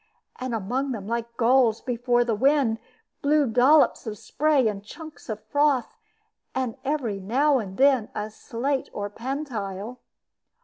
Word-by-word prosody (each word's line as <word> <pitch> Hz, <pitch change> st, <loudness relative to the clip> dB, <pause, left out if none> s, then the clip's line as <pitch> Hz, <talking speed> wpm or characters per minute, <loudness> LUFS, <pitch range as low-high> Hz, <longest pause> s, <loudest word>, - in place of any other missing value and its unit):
And 255 Hz, -2 st, -2 dB
among 250 Hz, +6 st, -2 dB
them, 205 Hz, -4 st, -6 dB
like 235 Hz, +1 st, -4 dB
gulls 235 Hz, -2 st, +4 dB
before 240 Hz, 0 st, +1 dB
the 235 Hz, -1 st, -1 dB
wind, 260 Hz, -1 st, +2 dB, 0.4 s
blew 295 Hz, +1 st, +3 dB
dollops 255 Hz, +3 st, +4 dB
of 210 Hz, -1 st, -4 dB
spray 290 Hz, -2 st, +2 dB
and 200 Hz, -2 st, -3 dB
chunks 310 Hz, +6 st, -11 dB
of 215 Hz, -1 st, -5 dB
froth, 285 Hz, -4 st, +1 dB, 0.6 s
with 260 Hz, -3 st, -1 dB
every 265 Hz, -8 st, -1 dB
now 265 Hz, +8 st, +2 dB
and 195 Hz, -4 st, -6 dB
then 265 Hz, -5 st, +4 dB
a 210 Hz, +1 st, -3 dB
slate 260 Hz, +5 st, -3 dB
or 205 Hz, 0 st, -4 dB
pantile. 235 Hz, -4 st, -5 dB
245 Hz, 140 wpm, -25 LUFS, 220-275 Hz, 0.6 s, gulls